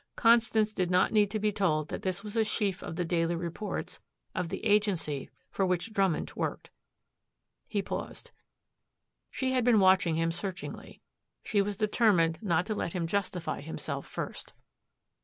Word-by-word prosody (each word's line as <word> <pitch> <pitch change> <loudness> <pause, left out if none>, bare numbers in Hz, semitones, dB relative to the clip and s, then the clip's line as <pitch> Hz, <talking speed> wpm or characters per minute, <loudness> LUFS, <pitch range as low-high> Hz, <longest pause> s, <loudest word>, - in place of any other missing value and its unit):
Constance 230 -2 +4
did 180 -3 0
not 180 0 +3
need 210 -2 +4
to 215 - -2
be 210 0 +1
told 155 -7 0
that - - -4
this 185 +1 -2
was 210 +1 -7
a 225 - +4
sheaf 205 -3 -1
of - - -6
the 175 - -1
daily 165 0 +1
reports 170 +5 -4 0.3
of 180 -2 -2
the - - -5
agency 195 -9 +1 0.2
for 195 - 0
which 185 +4 0
Drummond 195 -6 +1
worked. - - -3 1.0
He 205 -3 -1
paused. - - -6 1.0
She 260 -2 -1
had 255 -2 +2
been 235 -3 +5
watching 185 -3 +4
him 165 +1 +1
searchingly. 190 +2 -6 0.4
She 205 -3 +2
was 200 0 -2
determined 205 -7 +3
not 180 -4 +1
to 220 - -2
let 170 - -3
him 175 -2 -1
justify 185 -1 -2
himself 160 +3 -5
first. - - -6
195 Hz, 160 wpm, -30 LUFS, 170-210 Hz, 1.0 s, been